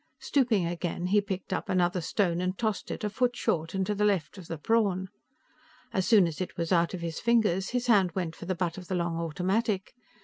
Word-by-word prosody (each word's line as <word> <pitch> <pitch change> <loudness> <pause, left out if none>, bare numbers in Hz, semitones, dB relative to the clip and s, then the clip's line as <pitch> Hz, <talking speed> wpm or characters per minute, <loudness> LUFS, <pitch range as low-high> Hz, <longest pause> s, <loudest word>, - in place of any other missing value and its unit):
Stooping 235 -10 +1
again, 175 0 -3
he 205 +3 +3
picked 195 -2 -4
up - - -3
another 180 -1 +2
stone 175 -1 0
and 185 +1 -1
tossed 215 -3 -2
it - - -5
a - - +1
foot 245 +2 +1
short 165 +2 -1
and 190 0 +1
to 210 - 0
the 210 0 -1
left 195 -6 +1
of 175 - -11
the 165 - -4
prawn. 190 0 +1 0.8
As 190 -1 0
soon 215 -5 +6
as 165 -1 -4
it 185 - -5
was 170 0 -2
out 170 0 +3
of 175 - -7
his 165 -1 -4
fingers, 210 -6 +2
his 245 0 -1
hand 195 -8 +4
went 170 -3 -3
for 175 - -9
the 185 - 0
butt 175 0 -2
of 180 - -11
the 185 - -2
long 170 -1 -1
automatic. 190 +5 -1
185 Hz, 230 wpm, -28 LUFS, 170-210 Hz, 0.8 s, soon